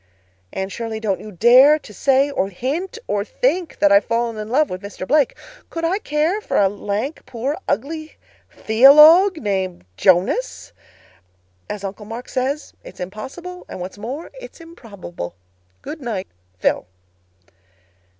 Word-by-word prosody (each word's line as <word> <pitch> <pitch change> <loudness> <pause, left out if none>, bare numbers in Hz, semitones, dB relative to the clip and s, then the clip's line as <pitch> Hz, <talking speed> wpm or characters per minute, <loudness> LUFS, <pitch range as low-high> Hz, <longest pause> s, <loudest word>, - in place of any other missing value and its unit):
"Anne 190 0 -3
Shirley, 220 +2 -5
don't 210 -4 -1
you 215 - -10
dare 250 - +6
to 245 -8 -14
say 275 +5 +2
or 195 -8 -1
hint 300 - -4
or 205 -1 -1
think 365 - -1
that 300 0 +3
I've 300 0 +6
fallen 230 0 -1
in 215 0 -6
love 290 +5 +3
with 185 0 -5
Mr. 200 -2 -7
Blake. 295 -3 +2 0.3
Could 330 0 -3
I 370 +5 0
care 320 +4 0
for - - -2
a 200 - +5
lank, 205 +8 -4
poor, 265 +7 -3
ugly 310 +7 -3 0.3
theologue—named 270 - +5
Jonas? 190 - +1 1.0
As 205 -1 -5
Uncle 200 +2 -7
Mark 230 +3 -7
says, 270 +4 -2
'It's - - -13
impossible, 265 - -7
and - - -7
what's 185 +3 -7
more 260 +10 -6
it's - - -12
improbable.' 200 - -9 0.5
"Good 310 - -7
night, 215 -7 -4 0.3
PHIL." - - 0
245 Hz, 140 wpm, -20 LUFS, 205-310 Hz, 1.0 s, dare